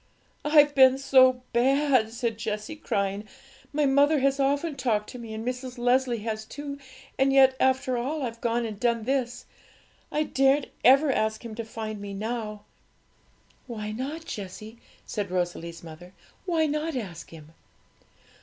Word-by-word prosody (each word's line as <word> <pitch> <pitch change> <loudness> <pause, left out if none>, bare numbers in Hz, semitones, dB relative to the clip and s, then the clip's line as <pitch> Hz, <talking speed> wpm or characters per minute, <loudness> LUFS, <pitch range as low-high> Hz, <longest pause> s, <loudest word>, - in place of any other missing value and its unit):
'I've 295 -1 +5
been 265 -1 +6
so 260 -2 +4
bad!' 260 -2 +3
said 230 -2 -3
Jessie, 215 +5 -4
crying. 200 -8 -2 0.5
'My 295 0 +1
mother 285 +3 +4
has 275 +1 +2
often 285 +3 0
talked 230 -6 -1
to 250 - -9
me, 230 -2 -8
and 220 +1 -6
Mrs. 250 0 -4
Leslie 245 -2 +1
has 220 -1 -3
too; 280 +4 -7 0.4
and 270 0 +4
yet, 265 -1 +6
after 260 -1 +1
all, 285 +5 -3
I've 230 -2 -5
gone 235 0 0
and 215 -3 -6
done 235 -1 +1
this. 250 -1 -2 0.7
I 305 - +1
daren't 270 0 +2
ever 275 +3 +6
ask 220 -1 -1
Him 230 - -6
to 230 - -5
find 220 -2 -6
me 200 -1 -6
now.' 215 0 -4 1.0
'Why 215 -3 -5
not, 280 +9 -5
Jessie?' 215 - -8 0.3
said 205 -3 -4
Rosalie's 175 -2 -3
mother; 170 +3 -12 0.3
'why 330 -3 +2
not 305 +1 -2
ask 190 -9 -6
Him?' 160 -1 -13
245 Hz, 155 wpm, -26 LUFS, 215-275 Hz, 1.0 s, been